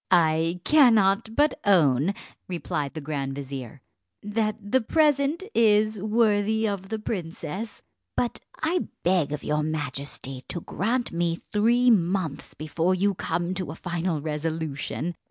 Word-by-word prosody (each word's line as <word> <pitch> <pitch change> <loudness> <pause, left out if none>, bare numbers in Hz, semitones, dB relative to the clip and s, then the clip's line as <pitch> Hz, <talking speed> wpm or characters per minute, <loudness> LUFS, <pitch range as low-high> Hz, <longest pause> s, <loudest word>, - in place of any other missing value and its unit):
"I 165 0 +3
cannot 225 -7 +4
but 295 +3 +3
own," 165 -2 +4 0.3
replied 155 -5 -3
the 155 - -4
grand 140 -2 -3
vizier, 135 -2 -7 0.4
"that 215 0 0
the 215 +5 +1
present 295 - +2
is 215 -1 +3
worthy 215 0 +2
of 195 -2 -4
the 220 - -2
princess; 195 0 -5 0.3
but 240 - 0 0.2
I 345 +2 +1 0.2
beg 175 -5 +2
of 150 - -4
your 150 0 0
majesty 140 -3 -4
to 170 - -4
grant 235 +9 -1
me 170 0 0
three 235 +7 +2
months 175 -6 0
before 165 +4 0
you 200 +2 +2
come 175 -1 -2
to 185 -3 -3
a 155 - -5
final 170 -2 -2
resolution. 155 +1 -3
185 Hz, 135 wpm, -26 LUFS, 155-215 Hz, 0.4 s, cannot